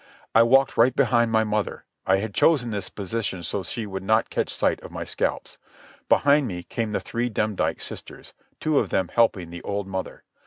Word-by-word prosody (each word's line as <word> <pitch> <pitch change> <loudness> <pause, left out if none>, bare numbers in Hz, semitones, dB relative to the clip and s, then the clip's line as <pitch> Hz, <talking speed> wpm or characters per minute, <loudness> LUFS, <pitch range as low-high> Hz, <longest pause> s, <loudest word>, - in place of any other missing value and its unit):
I 115 - +7
walked 135 +3 +4
right 120 +2 +4
behind 120 -4 +3
my 110 0 +3
mother. 105 -1 -2 0.2
I 95 - +4
had 100 +1 -4
chosen 125 -5 +3
this 100 -3 -3
position 100 -3 -4
so 90 - -2
that 95 - -7
she 115 +3 -4
would 95 -2 -5
not 110 +3 +1
catch - - -1
sight - - 0
of - - -10
my - - -5
scalps. - - -3 0.5
Behind 145 -1 +4
me 90 -4 -5
came 115 +4 -3
the 105 - 0
three 120 +1 -2
Demdike 105 -2 -1
sisters, - - -7 0.3
two 155 -2 +2
of - - -1
them 95 -2 0
helping 100 -7 +2
the 85 - -8
old 100 0 -3
mother. 95 -1 -5
110 Hz, 200 wpm, -24 LUFS, 95-120 Hz, 0.5 s, I